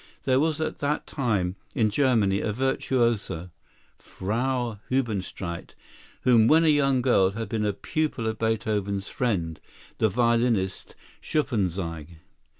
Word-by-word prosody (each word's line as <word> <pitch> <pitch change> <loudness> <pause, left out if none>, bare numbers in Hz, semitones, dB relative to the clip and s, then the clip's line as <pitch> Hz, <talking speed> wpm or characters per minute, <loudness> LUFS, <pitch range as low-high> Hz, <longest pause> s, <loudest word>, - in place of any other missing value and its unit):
There 130 -1 +3
was 155 +1 +1
at 160 - -2
that 145 +1 -1
time 100 -9 -1 0.2
in 110 -2 +2
Germany 110 -6 +2
a 105 - -1
virtuosa, 115 -7 0 0.5
Frau 120 +2 -2
Hebenstreit, 100 -8 -3 0.5
who 115 -3 +5
when 160 +4 +5
a - - +5
young 135 -4 +3
girl 95 -7 +4
had 115 +1 -4
been 105 -1 0
a - - +2
pupil 140 +4 -2
of 110 0 -2
Beethoven's 105 -3 -1
friend, 85 -10 -1 0.4
the 110 - +3
violinist 115 -3 +1 0.3
Schuppanzigh. 90 - -2
110 Hz, 125 wpm, -26 LUFS, 100-130 Hz, 0.5 s, who